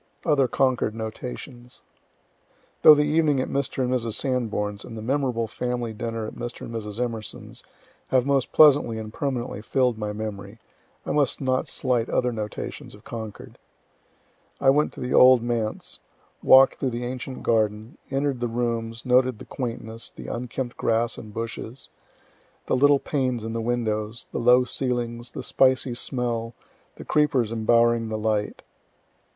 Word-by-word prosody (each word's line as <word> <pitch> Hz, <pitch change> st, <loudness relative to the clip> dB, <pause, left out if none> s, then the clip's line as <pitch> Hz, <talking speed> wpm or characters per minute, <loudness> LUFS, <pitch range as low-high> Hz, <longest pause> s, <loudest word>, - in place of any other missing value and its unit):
OTHER 145 Hz, -5 st, +3 dB
CONCORD 125 Hz, -3 st, +1 dB
NOTATIONS 120 Hz, +2 st, -8 dB, 1.0 s
Though 155 Hz, -, +10 dB
the 150 Hz, -, +3 dB
evening 150 Hz, -2 st, +2 dB
at 130 Hz, -, -1 dB
Mr. 135 Hz, -1 st, -1 dB
and 125 Hz, 0 st, 0 dB
Mrs. 115 Hz, -3 st, -1 dB
Sanborn's, 110 Hz, -5 st, -2 dB
and 115 Hz, -, -9 dB
the -, -, -6 dB
memorable 125 Hz, -2 st, 0 dB
family 120 Hz, 0 st, -3 dB
dinner 115 Hz, +1 st, -4 dB
at -, -, -7 dB
Mr. 120 Hz, 0 st, -7 dB
and -, -, -7 dB
Mrs. 105 Hz, -1 st, -5 dB
Emerson's, 115 Hz, -4 st, -5 dB, 0.4 s
have 130 Hz, -1 st, +2 dB
most 140 Hz, -2 st, +1 dB
pleasantly 145 Hz, -7 st, +5 dB
and 110 Hz, -1 st, -7 dB
permanently 125 Hz, -6 st, -3 dB
fill'd 125 Hz, 0 st, +1 dB
my 105 Hz, -1 st, -2 dB
memory, 105 Hz, 0 st, -6 dB, 0.5 s
I -, -, -2 dB
must 145 Hz, -4 st, +1 dB
not 130 Hz, -1 st, 0 dB
slight 125 Hz, -3 st, 0 dB
other 125 Hz, 0 st, +1 dB
notations 105 Hz, -3 st, -6 dB
of -, -, -18 dB
Concord. 110 Hz, -3 st, -8 dB, 1.0 s
I 135 Hz, -1 st, +5 dB
went 150 Hz, +2 st, +2 dB
to -, -, -11 dB
the 125 Hz, -, -3 dB
old 125 Hz, -2 st, +7 dB
Manse, 115 Hz, -3 st, -3 dB, 0.4 s
walk'd 135 Hz, 0 st, +6 dB
through 135 Hz, -, 0 dB
the 120 Hz, 0 st, -4 dB
ancient 130 Hz, +1 st, -6 dB
garden, 110 Hz, 0 st, 0 dB
enter'd 135 Hz, -1 st, -1 dB
the 120 Hz, -, -1 dB
rooms, 115 Hz, -1 st, -3 dB
noted 125 Hz, -1 st, +3 dB
the -, -, -11 dB
quaintness, 115 Hz, -2 st, -5 dB
the -, -, -11 dB
unkempt 120 Hz, +1 st, -4 dB
grass 115 Hz, +1 st, 0 dB
and 110 Hz, -, -10 dB
bushes, 115 Hz, +3 st, -6 dB, 0.8 s
the -, -, +1 dB
little 145 Hz, +2 st, +5 dB
panes 130 Hz, -5 st, -2 dB
in 115 Hz, 0 st, -4 dB
the 115 Hz, -, -2 dB
windows, 110 Hz, -2 st, -2 dB
the -, -, -3 dB
low 125 Hz, +1 st, +5 dB
ceilings, 120 Hz, -2 st, -2 dB
the -, -, -7 dB
spicy 130 Hz, -1 st, +2 dB
smell, 120 Hz, -2 st, -3 dB, 0.4 s
the -, -, -10 dB
creepers 140 Hz, -7 st, +2 dB
embowering 115 Hz, 0 st, +2 dB
the 110 Hz, -, -2 dB
light. 105 Hz, -1 st, -1 dB
120 Hz, 155 wpm, -25 LUFS, 115-130 Hz, 1.0 s, Though